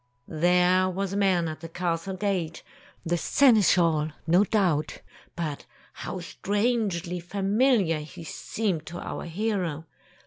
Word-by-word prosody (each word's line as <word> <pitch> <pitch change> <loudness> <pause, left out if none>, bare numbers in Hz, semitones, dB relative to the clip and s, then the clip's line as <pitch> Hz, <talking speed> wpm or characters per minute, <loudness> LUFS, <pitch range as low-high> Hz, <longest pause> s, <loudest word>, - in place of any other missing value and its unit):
There 180 +3 +3
was 195 +1 -3
a - - -1
man 185 -4 +2
at 155 -1 -5
the 165 0 -8
castle 175 +2 -2
gate, 185 -5 -2 0.4
the 175 +1 +1
seneschal, 175 - +4 0.2
no 175 +4 +4
doubt. 180 -8 0 0.3
But 155 -4 -4 0.3
how 185 - -6
strangely 200 -2 -1
familiar 195 - +1
he 160 +3 -9
seemed 175 0 -3
to 175 +1 -6
our - - -5
hero. 175 -4 -2
180 Hz, 125 wpm, -26 LUFS, 165-200 Hz, 0.4 s, seneschal